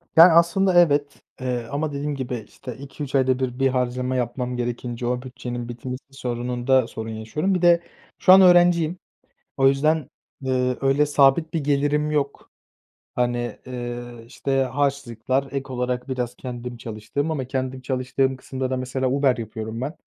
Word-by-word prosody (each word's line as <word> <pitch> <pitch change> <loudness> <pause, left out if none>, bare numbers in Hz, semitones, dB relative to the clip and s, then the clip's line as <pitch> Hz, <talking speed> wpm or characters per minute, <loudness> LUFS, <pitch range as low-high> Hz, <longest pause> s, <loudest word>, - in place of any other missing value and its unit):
Yani, 170 +2 +9
aslında 175 +2 +4
evet, 145 -3 +1 0.2
eee, 125 -2 -2
ama 150 +2 -1
dediğim 145 +1 -2
gibi, 130 -2 -3
işte, 125 - -9
2-3 140 +1 -7
ayda 130 -1 +3
1 130 -1 -3
bir 135 - +4
harcama 125 0 -1
yapmam 125 0 -2
gerekince 120 0 -3
o 125 0 -1
bütçenin 125 -2 -6
bitmesi 125 +2 -6
sorununda 125 0 0
sorun 110 0 -6
yaşıyorum. 130 - -1
Bir 180 - -1
de 170 -1 +5 0.4
şu 185 - +7
an 195 - +9
öğrenciyim, 175 -2 +5 0.6
o 135 -1 +5
yüzden, 150 +1 +1 0.3
eee, 125 -1 0
öyle 135 +2 +3
sabit 145 +3 +3
bir 160 -3 -1
gelirim 145 +1 +1
yok. 140 -2 -2 0.6
Hani, 120 -2 -1
eee, 120 -1 -5 0.2
işte, 135 +2 -1
harçlıklar, 135 -1 -1
ek 135 -1 -4
olarak 125 +1 -2
biraz 125 -2 -3
kendim 125 -1 -6
çalıştığım 115 +7 -4
ama 140 -5 -2
kendim 130 0 -3
çalıştığım 130 +1 -1
kısımda 130 0 -4
da 130 - 0
mesela 130 +1 -1
Uber 135 -2 +2
yapıyorum 110 0 -6
ben. 145 +6 -3
130 Hz, 155 wpm, -23 LUFS, 125-145 Hz, 0.6 s, Yani